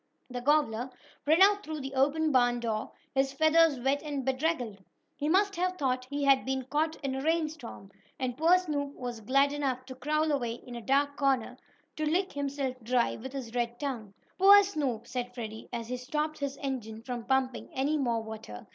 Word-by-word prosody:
The 245 0 -4
gobbler 260 -4 +2 0.4
ran 320 +5 +6
out 410 +1 +4
through 310 -1 -5
the 270 0 -6
open 295 +4 +2
barn 245 -2 +3
door, 220 -2 -2 0.2
his 270 0 +1
feathers 315 -1 +4
wet 270 +3 +1
and 285 -4 -4
bedraggled. 260 -7 -1 0.3
He 295 +1 -2
must 395 +3 +3
have 365 +1 0
thought 255 -2 -1
he 285 0 -2
had 275 -1 +5
been 265 0 -2
caught 310 +2 +1
in 270 -1 -1
a 265 - -3
rainstorm. 305 -10 -2 0.3
And 255 -2 -2
poor 330 +6 +5
Snoop 290 -5 -3
was 245 -3 -5
glad 275 +5 +3
enough 265 -3 -2
to 260 - -8
crawl 305 +4 0
away 245 -5 0
in 245 +1 -11
a 235 - -6
dark 280 +3 +1
corner, 265 -3 +1 0.4
to 310 - -2
lick 365 +5 +1
himself 280 -2 -2
dry 240 +1 +1
with 260 +4 -8
his 250 -4 -6
red 240 -1 -2
tongue. 235 -9 -4 0.2
"Poor 400 +2 +9
Snoop!" 280 - -2
said 245 0 -4
Freddie, 220 -2 -7
as 235 -1 -4
he 250 - -2
stopped 300 +5 -2
his 280 -1 -3
engine 230 -5 -4
from 245 -1 -4
pumping 265 -1 0
any 275 +4 0
more 235 -4 0
water. 215 - -8
270 Hz, 190 wpm, -30 LUFS, 245-300 Hz, 0.4 s, Poor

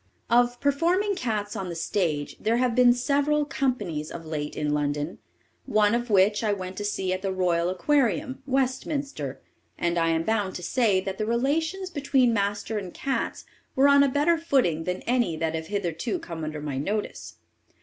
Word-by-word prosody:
Of 245 0 +3
performing 340 +9 +2
cats 215 - -2
on 190 -3 -4
the 170 - -5
stage, 165 -4 -1
there 225 +2 +1
have 250 -1 +2
been 250 0 +6
several 285 +4 +1
"companies" 210 - -2
of 165 - -8
late 150 -2 -4
in 150 -1 0
London, 145 +2 -2 0.5
one 210 -3 +3
of 240 0 -1
which 205 +2 +4
I 215 - +2
went 185 -1 -5
to 205 - -3
see 195 -2 -1
at 185 - -3
the 195 -1 -1
royal 175 -2 +1
Aquarium, 265 - +1
Westminster; 270 +2 -2 0.4
and 170 0 0
I 165 0 +2
am 165 0 +1
bound 205 -2 0
to 180 - -6
say 210 -3 +2
that 190 +1 -5
the 215 - -1
relations 320 +10 0
between 270 -5 +2
master 205 +1 -1
and 185 -3 -7
cats 270 +7 -3 0.3
were 270 +2 +5
on 280 0 +6
a 280 - +4
better 300 +5 +2
footing 250 - +1
than 180 0 -3
any 235 -10 +1
that 160 0 -1
have 160 0 -4
hitherto 200 - -2
come 170 - -7
under 155 -1 -4
my 145 -3 -3
notice. 205 +8 -3
210 Hz, 180 wpm, -26 LUFS, 175-265 Hz, 0.5 s, been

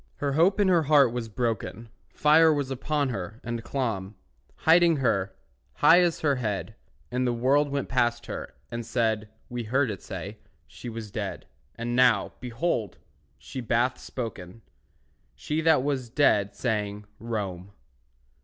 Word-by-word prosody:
Her 140 -1 -2
hope 175 +7 +3
in 205 - +4
her 175 -3 +4
heart 140 -5 +4
was 120 -2 -4
broken, 115 0 -3 0.2
Fire 160 +2 +5
was 145 -3 -1
upon 140 +2 -1
her, 110 0 -5
and 120 -1 -4
clomb, 110 -7 -3 0.5
Hiding 170 0 +6
her, 100 -8 0 0.4
high 175 +2 +6
as 175 -2 +1
her 145 -3 +2
head; 110 -3 -3 0.4
And 125 0 0
the - - +2
world 135 +5 +2
went 140 0 -2
past 120 -2 0
her, - - -7 0.2
and 120 0 -4
said 110 -2 -1 0.2
(We 120 -2 -5
heard 130 +2 +1
it 100 - -7
say) 95 +3 -7 0.3
she 120 - -9
was 110 -2 -7
dead; - - -5 0.3
And 120 +1 -3
now, 120 -5 +3
behold, 120 - -2 0.4
she 130 - -7
bath 120 +2 +1
spoken, 110 -4 -7 0.7
She 155 +1 -2
that 160 -5 +4
was 135 -4 -2
dead, 105 -7 +2
saying, 105 -3 -2
"Rome." 100 -5 -4
120 Hz, 150 wpm, -27 LUFS, 110-140 Hz, 0.7 s, Hiding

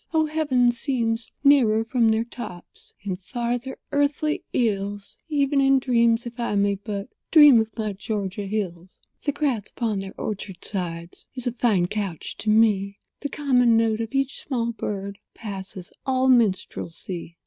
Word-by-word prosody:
Oh, 315 0 +4
heaven 285 -6 +2
seems 235 -2 -2
nearer 240 -6 +5
from 235 -1 +2
their 220 +1 +2
tops— 220 -7 -10
And 190 -3 -3
farther 240 +5 -3
earthly 290 +2 0
ills— 205 -3 -1
Even 280 -2 +2
in 270 0 +5
dreams, 235 -2 +2
if 240 +1 -8
I 235 -3 -1
may 200 0 +3
but 200 +2 -5 0.2
Dream 295 -6 +8
of 220 - -3
my 215 -2 -2
Georgia 200 0 -4
hills. 185 -4 -4 0.3
The 290 - +2
grass 275 -8 -1
upon 220 -4 -2
their 195 0 -7
orchard 195 -3 -5
sides 170 -3 -5
Is 255 - -5
a 245 - +1
fine 220 -6 +2
couch 195 -3 -4
to 220 - -3
me; 205 -2 +3 0.2
The 285 - -4
common 250 -5 +3
note 225 -1 +2
of 225 +4 -5
each 270 0 0
small 235 -4 -1
bird 200 -3 -5 0.2
Passes 190 -4 -8
all 260 0 +2
minstrelsy. 185 -6 0
225 Hz, 155 wpm, -24 LUFS, 200-255 Hz, 0.3 s, Dream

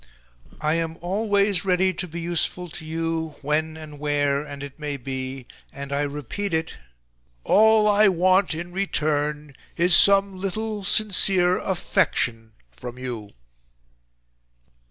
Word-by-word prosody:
I 155 0 +1
am 165 0 -2
ALWAYS 200 0 +1
READY 185 0 +2
to 180 +1 -4
be 170 +1 -7
useful 175 +1 -1
to 160 - -8
you 160 0 -3
when 155 +2 -1
and 150 -2 -10
where 145 -1 0
and 140 -1 -8
it 140 +1 -9
may 145 -2 -3
be, 130 0 -5 0.3
and 140 0 -7
I 140 - 0
repeat 150 - -3
it, 160 0 -2 0.7
ALL 220 0 +5
I 210 0 +5
WANT 185 -1 +3
IN 175 +2 -6
RETURN 150 -6 -1 0.2
IS 175 0 +6
SOME 195 -1 +5
LITTLE 210 +2 -3
SINCERE 190 -3 +2
AFFECTION 115 - -1 0.2
FROM 120 - -9
YOU." 120 -5 -6
165 Hz, 130 wpm, -23 LUFS, 145-190 Hz, 0.7 s, IS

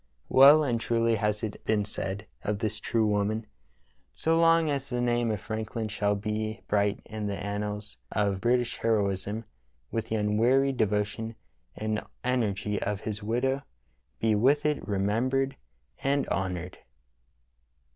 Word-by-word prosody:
Well 145 +4 +8
and 120 -5 0
truly 115 -1 +2
has 105 +1 -1
it 105 -2 -5
been 105 -2 +1
said 100 0 -4 0.2
of 105 0 -1
this 105 +1 -2
true 115 -2 +1
woman: 105 +1 0 0.7
So 165 +1 +1
long 165 0 +5
as 140 -2 -2
the 125 - -1
name 120 -1 +1
of 105 -2 -1
Franklin 110 +1 -4
shall 105 0 +1
be 110 +2 -3
bright 100 -1 +1
in 110 -1 -4
the 100 -1 -2
annals 105 +1 -4
of 100 -3 0
British 120 +1 +1
heroism 105 0 0 0.5
will 115 - 0
the 110 0 -4
unwearied 120 +6 +2
devotion 105 +1 0 0.4
and 110 0 -2 0.2
energy 105 -5 0
of 105 0 -2
his 105 -1 -4
widow 125 +6 0 0.6
be 110 -1 +2
with 135 +8 +3
it 150 -1 0
remembered 120 +7 +1 0.4
and 140 +1 +1
honored." 90 -1 -3
110 Hz, 140 wpm, -28 LUFS, 105-120 Hz, 0.7 s, Well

